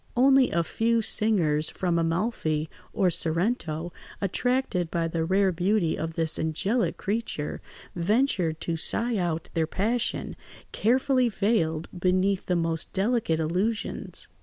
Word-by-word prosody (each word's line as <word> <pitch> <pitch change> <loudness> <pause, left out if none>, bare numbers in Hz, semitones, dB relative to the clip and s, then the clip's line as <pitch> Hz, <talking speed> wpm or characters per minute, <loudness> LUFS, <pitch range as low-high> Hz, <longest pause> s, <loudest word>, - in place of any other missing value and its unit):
Only 265 0 +5
a 170 - +1
few 230 +6 0
singers 170 -10 +2
from 175 -2 -1
Amalfi 165 -3 -1 0.2
or 190 -5 +2
Sorrento, 170 -1 0 0.3
attracted 200 -3 0
by 170 -1 -1
the 165 0 -2
rare 190 +3 +2
beauty 180 0 +1
of 165 +1 -4
this 160 -1 +1
angelic 195 +9 0
creature, 205 -8 -3 0.3
ventured 180 - +1
to 165 -1 -2
sigh 230 +7 +1
out 170 -3 -2
their 160 -2 0
passion, 225 +8 -1 0.4
carefully 255 +2 +2
veiled 190 -7 0
beneath 185 +2 +1
the 180 - +1
most 165 -1 -1
delicate 200 -5 +1
allusions. 185 +8 -2
180 Hz, 125 wpm, -26 LUFS, 165-225 Hz, 0.4 s, Only